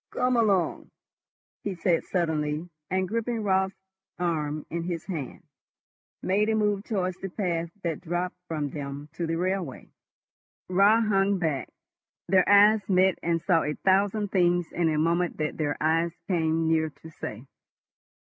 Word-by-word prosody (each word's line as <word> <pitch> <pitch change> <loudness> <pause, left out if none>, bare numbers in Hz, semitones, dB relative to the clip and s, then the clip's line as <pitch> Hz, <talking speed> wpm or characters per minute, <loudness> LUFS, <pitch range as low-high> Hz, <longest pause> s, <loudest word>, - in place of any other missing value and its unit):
"Come 250 0 +1
along," 205 -6 +1 0.7
he 200 -2 -3
said 170 -1 +1
suddenly, 160 -2 -1 0.2
and, 185 0 0
gripping 230 +2 -2
Raut's 190 -1 +1 0.4
arm 155 -4 -2
in 170 - -2
his 170 -2 -4
hand, 160 -5 -5 0.8
made 205 +3 +2
a 220 - +2
move 210 -2 +1
towards 185 -4 -1
the 195 - -6
path 170 -4 -2
that 165 -3 -2
dropped 175 +1 -2
from 150 -4 -3
them 145 0 -6
to 170 0 -3
the 165 - -1
railway. 180 -5 -2 0.8
Raut 200 +5 +4
hung 200 -2 +2
back. 160 -6 -1 0.6
Their 185 0 +4
eyes 205 +2 +7
met 185 0 +3
and 165 -1 0
saw 170 -4 +3
a 150 0 -2
thousand 200 +2 +2
things 175 -2 +2
in 170 -2 +1
a 155 - 0
moment 170 +3 +1
that 155 -1 -2
their 145 -2 -1
eyes 165 +2 +1
came 160 -3 +1
near 160 -1 +2
to 160 +2 -14
say. 115 -5 -7
175 Hz, 150 wpm, -27 LUFS, 160-195 Hz, 0.8 s, eyes